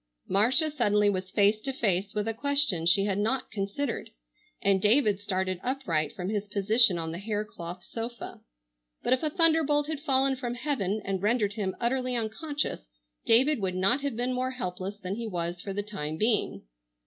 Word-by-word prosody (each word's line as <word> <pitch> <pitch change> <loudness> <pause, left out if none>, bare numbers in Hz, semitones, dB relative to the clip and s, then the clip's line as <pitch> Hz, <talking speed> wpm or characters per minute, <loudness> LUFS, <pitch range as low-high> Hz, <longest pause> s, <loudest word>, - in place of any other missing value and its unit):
Marcia 255 - +3
suddenly 210 -7 +2
was 185 -1 -4
face 205 +2 +3
to 270 - -3
face 200 -4 -1
with 210 +1 -1
a 225 - 0
question 275 - +1
she 195 +3 +4
had 200 -1 -1
not 250 +5 -1
considered, 220 +6 -3 0.5
and 195 -1 +2
David 210 -2 +3
started 185 -2 -2
upright 175 - -1
from 180 -1 -4
his 210 -1 -2
position 210 0 +3
on 165 -1 -4
the 170 - -6
hair 210 +1 -2
cloth 175 -3 -8
sofa. 235 +1 -7 0.6
But - - +3
if 255 - +1
a 310 - 0
thunderbolt 315 -3 +4
had 310 -1 -4
fallen 270 -2 +2
from 245 -2 -4
heaven 220 -6 -2
and 195 -2 -2
rendered 210 -1 +1
him 200 -4 -3
utterly 250 +1 0
unconscious 265 +7 -2 0.5
David 265 +5 +4
would 185 -2 -2
not 195 +9 +3
have 280 -4 -2
been 245 +2 -1
more 255 +1 -1
helpless 195 -5 -5
than 190 -2 -5
he 230 -1 -4
was 175 -2 -3
for 200 - -5
the 205 +1 -3
time 160 -7 -5
being. 215 +2 0
215 Hz, 185 wpm, -28 LUFS, 195-255 Hz, 0.6 s, she